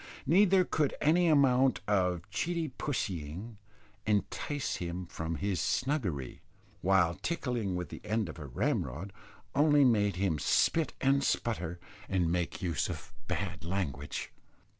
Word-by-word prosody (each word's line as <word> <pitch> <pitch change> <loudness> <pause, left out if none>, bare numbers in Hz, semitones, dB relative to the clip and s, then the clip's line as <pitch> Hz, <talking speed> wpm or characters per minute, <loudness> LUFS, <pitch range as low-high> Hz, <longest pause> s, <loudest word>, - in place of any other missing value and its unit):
Neither 185 +4 +5
could 150 -5 0
any 170 +4 +4
amount 135 -4 +4
of 90 -3 +1
"cheety 165 - -1
pussying" 95 - -3 0.5
entice 110 +7 -1
him 90 +1 -4
from 80 -1 -4
his 95 +1 -1
snuggery, 105 - -1 0.4
while 90 -3 +4
tickling 120 - -2
with 90 -3 -3
the - - -8
end 110 -2 0
of 80 - -8
a 75 - -7
ramrod 75 +8 -2 0.4
only 145 0 +5
made 105 -5 +3
him 90 -5 0
spit 160 - +2
and 135 +1 +3
sputter, 90 -10 -1 0.3
and 90 -4 +1
make 90 +1 -2
use 85 -4 0
of - - -7
bad - - -3
language. 80 -6 -3
100 Hz, 130 wpm, -31 LUFS, 85-140 Hz, 0.5 s, Neither